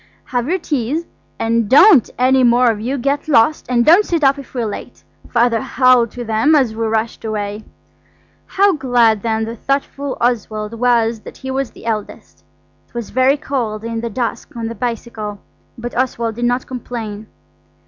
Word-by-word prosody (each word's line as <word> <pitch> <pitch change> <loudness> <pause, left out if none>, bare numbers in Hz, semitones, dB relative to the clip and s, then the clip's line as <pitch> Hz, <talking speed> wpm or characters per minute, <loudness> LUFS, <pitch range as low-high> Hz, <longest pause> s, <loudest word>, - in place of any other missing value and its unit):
"Have 245 +2 -2
your 370 - +1
teas; 300 -1 -2 0.3
and 230 -2 0
don't 295 - +7
any 260 +1 +3
more 240 0 +4
of 210 -1 -5
you 260 +5 -2
get 280 +4 -1
lost, 295 +1 +3
and 240 -1 +2
don't 350 +7 +7
sit 335 -6 -1
up 275 +1 +4
if 270 - -12
we're 240 -2 -1
late," 210 - -7 0.3
Father 235 -2 +2
howled 255 -2 +3
to 245 - -6
them 225 +8 +3
as 260 -7 +2
we 225 0 -1
rushed 220 +1 -2
away. 210 -1 -4 0.8
How 395 0 +3
glad 240 - +2
then 220 0 -1
the 230 +1 -6
thoughtful 275 +2 -3
Oswald 220 -3 -1
was 230 -1 +1
that - - -12
he 265 0 -6
was 270 -1 -2
the - - -15
eldest. 215 -2 -5 0.4
It - - -34
was 235 -2 -5
very 260 +3 +3
cold 235 -7 -3
in 230 0 -3
the 235 - -3
dusk 245 +5 -4
on 230 -1 -4
the - - -5
bicycle, 225 -2 -5 0.4
but 240 +1 -6
Oswald 235 -3 -1
did 240 +2 -3
not 245 +1 0
complain. 225 -4 -6
240 Hz, 180 wpm, -18 LUFS, 225-265 Hz, 0.8 s, don't